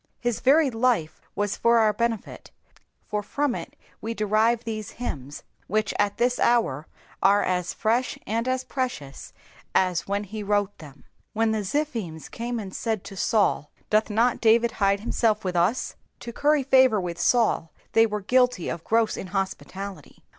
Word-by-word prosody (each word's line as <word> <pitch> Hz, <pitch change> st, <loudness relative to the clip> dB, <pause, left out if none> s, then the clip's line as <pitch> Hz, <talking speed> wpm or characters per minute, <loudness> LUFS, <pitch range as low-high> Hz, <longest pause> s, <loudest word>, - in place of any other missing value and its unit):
His 240 Hz, -3 st, -1 dB
varied 275 Hz, 0 st, +4 dB
life 225 Hz, -9 st, 0 dB
was 205 Hz, -1 st, -1 dB
for 235 Hz, 0 st, +3 dB
our 215 Hz, -2 st, +4 dB
ben^, 230 Hz, 0 st, -2 dB, 0.7 s
for 210 Hz, 0 st, -2 dB
from 280 Hz, +5 st, -1 dB
U -, -, -4 dB, 0.4 s
we 230 Hz, +1 st, -4 dB
derive 220 Hz, +2 st, +2 dB
these 215 Hz, -2 st, -5 dB
hymns, 145 Hz, -, -6 dB, 0.2 s
which 215 Hz, +1 st, 0 dB
at 205 Hz, -1 st, +1 dB
this 245 Hz, +1 st, +1 dB
hour 165 Hz, -, +2 dB, 0.3 s
are 200 Hz, +1 st, +4 dB
as 180 Hz, -1 st, -1 dB
fresh 235 Hz, +3 st, 0 dB
and 230 Hz, +3 st, -1 dB
as 255 Hz, 0 st, 0 dB
precious 245 Hz, -, -5 dB, 0.4 s
as 185 Hz, -3 st, +1 dB
when 200 Hz, +1 st, -1 dB
he 210 Hz, +2 st, -7 dB
wrote 205 Hz, -1 st, 0 dB
them. 145 Hz, -3 st, -13 dB, 0.3 s
When 225 Hz, 0 st, +1 dB
the 220 Hz, -, 0 dB
Ziphims 215 Hz, -, -3 dB
came 240 Hz, +1 st, -4 dB
and 195 Hz, -3 st, -7 dB
said 220 Hz, -4 st, -2 dB
to -, -, -9 dB
Sanl, 200 Hz, -6 st, +1 dB, 0.2 s
Doth 215 Hz, +1 st, +3 dB
not 230 Hz, +3 st, +1 dB
David 230 Hz, +1 st, +4 dB
hide 200 Hz, -1 st, +1 dB
himself 220 Hz, -2 st, 0 dB
with 180 Hz, -1 st, -2 dB
us? 180 Hz, +9 st, +1 dB, 0.3 s
To 235 Hz, -, -7 dB
curry 295 Hz, +2 st, +2 dB
favour 260 Hz, -4 st, +5 dB
with 175 Hz, -2 st, -4 dB
Saul 225 Hz, -7 st, +2 dB, 0.2 s
they 225 Hz, 0 st, +5 dB
were 210 Hz, -1 st, -3 dB
guilty 250 Hz, -3 st, +2 dB
of 165 Hz, -, -5 dB
gross 225 Hz, -1 st, +1 dB
inhospUalUy. 195 Hz, +1 st, -5 dB
215 Hz, 160 wpm, -25 LUFS, 195-235 Hz, 0.7 s, favour